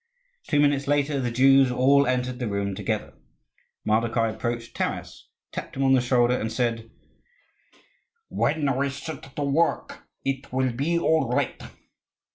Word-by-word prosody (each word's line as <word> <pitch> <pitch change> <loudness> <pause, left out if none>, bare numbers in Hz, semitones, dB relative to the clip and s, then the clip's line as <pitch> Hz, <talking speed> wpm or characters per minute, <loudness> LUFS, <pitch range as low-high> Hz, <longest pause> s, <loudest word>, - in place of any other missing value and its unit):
Two 145 - +2
minutes 145 -1 +2
later 145 0 +1
the 125 -2 -1
Jews 135 +2 +5
all 140 +3 +4
entered 125 0 -1
the 120 - -2
room 100 -1 -2
together. - - -3 0.7
Mardokhai 115 +1 +1
approached 120 -1 -4
Taras, - - -4 0.2
tapped - - -7
him 135 - 0
on 135 0 +4
the 130 - +4
shoulder, 125 0 +2
and 110 -3 -3
said, 115 -2 -2 1.4
"When 145 -5 0
we 140 +2 0
set 140 0 -8
to 145 - -2
work 150 +4 -1 0.2
it 135 0 -3
will 130 0 +1
be 150 +8 0
all 160 -1 +2
right." - - -1
130 Hz, 145 wpm, -25 LUFS, 120-140 Hz, 1.4 s, Jews